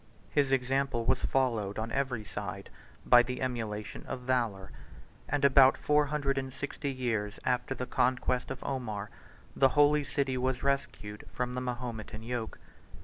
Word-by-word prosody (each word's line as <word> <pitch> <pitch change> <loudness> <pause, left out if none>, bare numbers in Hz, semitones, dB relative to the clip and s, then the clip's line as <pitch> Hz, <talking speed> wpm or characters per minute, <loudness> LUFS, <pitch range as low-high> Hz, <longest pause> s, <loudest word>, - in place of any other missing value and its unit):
His 140 -2 +2
example 135 -2 +1
was 130 +2 +3
followed 115 -7 0
on 110 +1 -3
every 125 -4 -1
side 100 -2 -6 0.3
by 120 - +8
the 125 +1 -4
emulation 110 -5 -3
of 125 - -4
valor; 115 -7 -1 0.6
and 145 0 +2
about 135 -1 +7
four 150 0 +3
hundred 140 -2 0
and 130 0 -5
sixty 140 +1 -4
years 115 -5 -2
after 125 +1 0
the 125 - -3
conquest 125 0 +1
of 135 -1 -6
Omar, 110 -7 -3 0.4
the 135 - +5
holy 145 0 +5
city 135 -2 -1
was 130 0 -1
rescued 135 -6 -2
from 125 0 -2
the 125 - -2
Mahometan 120 -3 -5
yoke. 115 -1 -4
125 Hz, 150 wpm, -30 LUFS, 115-135 Hz, 0.6 s, by